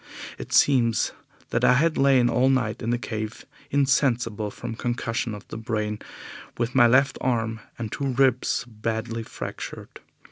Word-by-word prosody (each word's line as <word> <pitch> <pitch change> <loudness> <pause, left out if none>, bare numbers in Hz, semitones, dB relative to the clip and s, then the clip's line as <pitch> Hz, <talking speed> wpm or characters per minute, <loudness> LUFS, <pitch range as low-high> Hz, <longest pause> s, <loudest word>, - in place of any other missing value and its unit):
It - - -8
seems 120 -5 +3 0.4
that - - 0
I - - +6
had 155 +5 +3
lain 135 -3 +4
all 125 +2 +3
night 115 -4 0
in 115 - -2
the 120 - +2
cave 110 -1 -5 0.2
insensible 125 -6 +1
from 115 +3 -6
concussion 115 -1 -2
of 105 - -12
the - - -6
brain, 105 -2 -2 0.6
with 120 +1 -1
my 120 -3 +6
left 130 +3 +3
arm 115 -3 0 0.2
and 110 -2 -5
two 140 - -2
ribs 130 -1 +2
badly 115 +1 -3
fractured. 110 - -7
120 Hz, 150 wpm, -25 LUFS, 110-130 Hz, 0.6 s, I